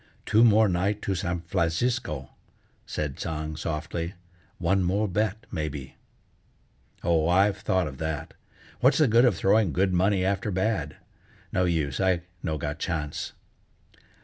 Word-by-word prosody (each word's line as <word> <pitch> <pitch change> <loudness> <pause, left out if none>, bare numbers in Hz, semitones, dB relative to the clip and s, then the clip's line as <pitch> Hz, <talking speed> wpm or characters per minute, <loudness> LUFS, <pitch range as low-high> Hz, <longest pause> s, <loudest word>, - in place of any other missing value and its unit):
"Two 110 +2 +4
more 110 -1 +6
night' 95 +3 0
to 100 - 0
San 90 -2 -2
Flancisco," 85 - -1 0.6
said 75 -2 -3
Tsang 80 -1 -3
softly; 85 +2 -4 0.4
"one 95 0 +2
more 100 +4 +1
bet, 105 +2 -1
maybe!" 75 -4 -4 1.1
"Oh, 85 -1 +2
I've 95 +3 +4
thought 95 -1 +1
of 65 -3 -7
that. 80 -2 -3 0.5
What's 130 +3 +4
the 155 - +5
good 115 +2 +5
of 125 - +3
throwing 100 -2 +3
good 95 +3 +2
money 95 +1 +2
after 100 +2 0
bad? 95 -4 -1 0.6
No 90 - +2
use, 80 -6 0
I 95 -3 +2 0.2
no 80 -1 -2
got 75 +1 -4
chance." 75 -4 -3
90 Hz, 140 wpm, -27 LUFS, 80-100 Hz, 1.1 s, more